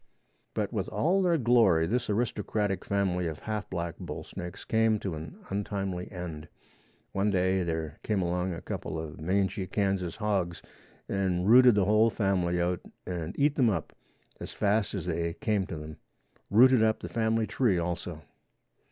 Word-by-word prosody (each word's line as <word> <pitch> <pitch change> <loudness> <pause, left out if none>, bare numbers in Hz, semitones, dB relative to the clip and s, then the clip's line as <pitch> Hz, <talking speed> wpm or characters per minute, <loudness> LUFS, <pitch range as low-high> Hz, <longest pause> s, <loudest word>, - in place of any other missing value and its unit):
But - - -1
with - - -2
all 185 +5 +2
their 175 -3 +3
glory 115 - +4
this 120 +8 -1
aristocratic 105 -3 -1
family 95 -3 0
of 80 -2 -4
half 105 -1 -4
black 85 -2 -4
bull - - -6
snakes 85 0 -8
came 110 -1 +3
to 95 -4 -4
an 80 0 -7
untimely 95 -2 -3
end. 85 -4 -6 0.6
One 100 +2 +1
day 95 -1 +2
there 80 -3 -3
came 105 -3 0
along 90 +1 -1
a 85 - -6
couple 80 - -4
of 80 -1 -7
mangy 95 +2 0
Kansas 95 -3 -1
hogs 95 -6 -1 0.4
and 95 -2 0
rooted 125 0 +8
the 100 -2 +3
whole 110 +3 +4
family 95 -5 0
out 90 0 0 0.3
and 85 0 -4
eat 145 0 +3
them 130 -5 +3
up 100 - -3 0.4
as - - -7
fast 105 0 +1
as - - -4
they 85 0 -1
came 105 -4 0
to 80 - -5
them; 75 0 -8 0.5
rooted 125 +3 +6
up 110 0 +2
the - - -5
family 110 -1 +1
tree 110 -5 +1
also. 85 -1 -3
95 Hz, 165 wpm, -29 LUFS, 85-110 Hz, 0.6 s, rooted